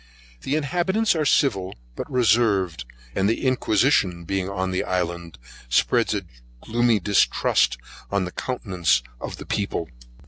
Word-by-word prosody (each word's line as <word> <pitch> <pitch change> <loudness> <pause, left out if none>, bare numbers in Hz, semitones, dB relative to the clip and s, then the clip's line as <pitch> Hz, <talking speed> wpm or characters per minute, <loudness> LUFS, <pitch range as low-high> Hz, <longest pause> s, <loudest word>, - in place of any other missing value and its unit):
The 140 - -1
inhabitants 180 +8 +1
are 155 -2 0
civil, 100 -10 +1 0.2
but - - -6
reserved, 105 - +2 0.3
and 100 +1 +1
the 115 - -1
inquisition 110 -7 +2
being 95 +2 -2
on 95 -1 -2
the 90 - -1
island, 85 -4 -3 0.3
spreads 60 - +2
a - - -3 0.3
gloomy 115 - +1
distrust 100 -9 +2 0.3
on 100 -2 0
the 90 - -6
countenance 90 - 0 0.2
of - - -6
the - - -9
people. 100 -5 -2
100 Hz, 135 wpm, -23 LUFS, 90-125 Hz, 0.3 s, reserved